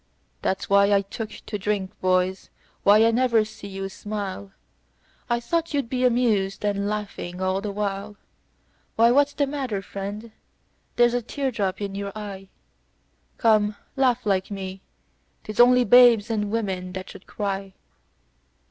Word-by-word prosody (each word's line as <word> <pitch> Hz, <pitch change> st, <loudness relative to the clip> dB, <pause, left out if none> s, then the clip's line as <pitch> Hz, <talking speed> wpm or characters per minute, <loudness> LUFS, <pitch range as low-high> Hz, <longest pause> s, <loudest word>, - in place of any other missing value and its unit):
"That's 190 Hz, -, -1 dB
why 200 Hz, 0 st, +4 dB
I 200 Hz, -, +4 dB
took 215 Hz, +2 st, -6 dB
to 210 Hz, 0 st, -7 dB
drink, 200 Hz, -1 st, -1 dB
boys. 185 Hz, 0 st, +1 dB, 0.3 s
Why, 210 Hz, +2 st, +6 dB
I 230 Hz, -, +4 dB
never 230 Hz, -2 st, +3 dB
see 215 Hz, -1 st, -10 dB
you 195 Hz, 0 st, -5 dB
smile, 200 Hz, -1 st, -6 dB, 0.8 s
I 240 Hz, 0 st, +1 dB
thought 330 Hz, +6 st, -1 dB
you'd 275 Hz, -5 st, -1 dB
be 255 Hz, 0 st, -1 dB
amused, 220 Hz, -6 st, +1 dB
and 200 Hz, -1 st, 0 dB
laughing 200 Hz, -4 st, -5 dB
all 185 Hz, +1 st, 0 dB
the 205 Hz, 0 st, -3 dB
while. 200 Hz, 0 st, -4 dB, 0.8 s
Why, 230 Hz, +1 st, +5 dB
what's 285 Hz, +2 st, +3 dB
the 285 Hz, -, +1 dB
matter, 265 Hz, -8 st, -3 dB
friend? 200 Hz, +4 st, -6 dB, 0.6 s
There's 240 Hz, 0 st, +4 dB
a 245 Hz, -, 0 dB
tear 270 Hz, +3 st, -3 dB
drop 195 Hz, -4 st, -2 dB
in 200 Hz, -1 st, -3 dB
you 200 Hz, 0 st, -4 dB
eye, 195 Hz, -3 st, -7 dB, 0.9 s
Come, 215 Hz, -2 st, +3 dB, 0.2 s
laugh 250 Hz, -3 st, +2 dB
like 190 Hz, -2 st, +1 dB
me. 190 Hz, -1 st, -6 dB, 0.6 s
'Tis 215 Hz, +1 st, -7 dB
only 250 Hz, +1 st, +7 dB
babes 240 Hz, -3 st, +6 dB
and 210 Hz, -2 st, -1 dB
women 190 Hz, -5 st, -3 dB
that 185 Hz, 0 st, -7 dB
should 195 Hz, -, -14 dB
cry. 195 Hz, -2 st, -4 dB
210 Hz, 150 wpm, -24 LUFS, 195-235 Hz, 0.9 s, only